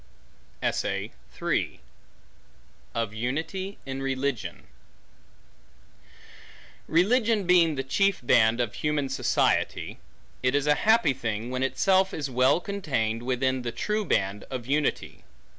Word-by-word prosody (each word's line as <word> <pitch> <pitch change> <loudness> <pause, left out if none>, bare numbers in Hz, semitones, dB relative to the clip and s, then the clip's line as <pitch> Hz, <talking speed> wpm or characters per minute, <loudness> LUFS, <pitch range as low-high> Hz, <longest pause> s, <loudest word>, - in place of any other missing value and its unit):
Of - - 0 2.3
Unity 160 - -3
In 135 0 -5
Religion 135 -2 -2 2.2
RELIGION 215 +5 +3
being 170 -3 +4
the 135 - -2
chief 195 +8 +1
band 115 0 +4
of 120 -4 -1
human 150 -2 -1
society, - - 0 0.4
it 125 +2 +1
is 145 -1 +1
a 150 - +5
happy 220 -4 +3
thing, 110 0 -4
when 130 0 -2
itself 190 +8 +2
is 145 -3 -4
well 130 +5 +4
contained 140 - -2
within 130 +1 0
the 120 -1 -3
true 210 - -1
band 100 - 0
of 130 -3 -5
unity. 145 +2 -1
135 Hz, 110 wpm, -27 LUFS, 125-180 Hz, 2.3 s, a